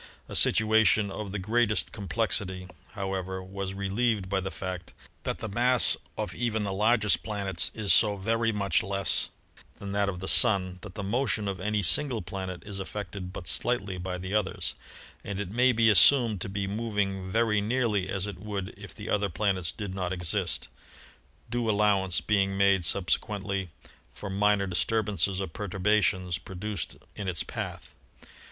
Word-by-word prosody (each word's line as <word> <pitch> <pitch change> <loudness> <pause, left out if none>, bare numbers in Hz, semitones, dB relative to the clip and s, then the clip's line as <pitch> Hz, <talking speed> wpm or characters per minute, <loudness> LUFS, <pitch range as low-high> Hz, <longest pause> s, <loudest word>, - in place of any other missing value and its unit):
A - - -7
situation 110 -2 +4
of 105 -1 -5
the 100 - -3
greatest 110 +2 +1
com 100 -3 -7
plexity, 95 -5 -1 0.3
however, 95 -2 -3
was 95 0 -5
relieved 100 0 0
by 95 0 +1
the 95 0 -3
fact 95 -2 -6 0.3
that - - -1
the 110 - -5
mass 120 +4 +4 0.2
of - - -3
even 110 -3 -1
the 100 -1 -2
largest 105 0 +3
planets 100 -3 0
is 105 -3 +3
so 105 -2 +5
very 115 +3 +1
much 100 -5 +1
less 100 0 0 0.5
than 100 -1 -7
that 100 0 +1
of 90 -2 -5
the 95 - -5
Sun 95 -7 +4
that 105 -3 -10
the 100 - -4
motion 110 0 0
of 95 -2 -3
any 105 +1 -1
single 110 - +3
planet 95 0 -6
is 100 -2 -6
affected 95 -1 -6
but 90 -2 -8
slightly 100 - 0
by 90 0 -4
the 95 +2 -6
others, 105 -3 -1 0.5
and 100 -1 -5
it 100 -2 -4
may 125 +3 +4
be 115 -1 +3
assumed 110 -1 +6
to - - -3
be 100 0 -2
moving 100 -3 -2
very 110 0 +2
nearly 105 -4 0
as 95 0 -2
it 105 -3 -7
would 100 -2 -4
if 100 0 -11
the 105 - -8
other 100 -1 +1
planets 95 -1 0
did 100 -4 -6
not 95 -2 -3
exist, 90 0 -2 0.8
due 120 -1 -1
allowance 100 -3 +2
being 95 -2 +1
made 100 -2 +4
subsequently 100 +1 0 0.5
for 100 - -6
minor 105 0 +2
disturbances 100 0 0
or 95 - -1
perturbations 95 -1 0
produced 95 -1 -5 0.2
in 100 - -5
its 90 -3 -1
path. - - -6
100 Hz, 165 wpm, -28 LUFS, 95-105 Hz, 0.8 s, assumed